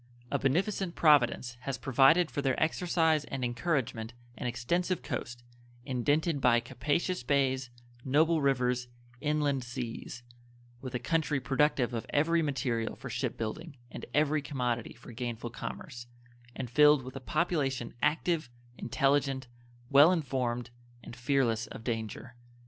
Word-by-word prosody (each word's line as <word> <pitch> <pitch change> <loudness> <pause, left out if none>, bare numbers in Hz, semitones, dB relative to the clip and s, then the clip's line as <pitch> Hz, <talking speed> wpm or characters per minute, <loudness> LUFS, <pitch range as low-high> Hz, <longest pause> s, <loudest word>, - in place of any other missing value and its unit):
A - - +1
beneficent 180 +6 0
Providence 125 -5 +3
has 130 +1 -4
provided 135 +6 +4
for 145 - -2
their 135 -2 0
exercise 160 -1 +2
and 135 -2 -3
encouragement 120 -3 -2 0.2
an 125 - -4
extensive 170 +10 -1
coast, 120 0 -5 0.4
indented 145 +4 0
by 120 -2 +5
capacious 145 +9 -1
bays, 130 -1 +1 0.3
noble 155 +4 +3
rivers, 125 -2 +1 0.3
inland 150 -3 0
seas; 120 -1 -6 0.6
with 130 -1 -6
a - - +2
country 150 +2 0
productive 135 -1 +1
of 115 - -4
every 165 +3 +2
material 130 -6 -1
for 125 - -8
ship 125 +1 -2
building 140 +7 -5
and - - -8
every 150 +1 +2
commodity 125 -5 -2
for 120 +1 -13
gainful 120 -1 -5
commerce, 120 +1 -7 0.5
and 130 - -4
filled 150 0 +6
with 130 +1 -9
a - - -4
population 140 -5 -1
active, 155 0 +1 0.3
intelligent, 135 +1 +1 0.5
well 145 +5 +8
informed, 125 -7 -1 0.3
and - - -9
fearless 120 -4 +1
of 110 - -9
danger. 115 +1 -4
135 Hz, 130 wpm, -30 LUFS, 120-150 Hz, 0.6 s, well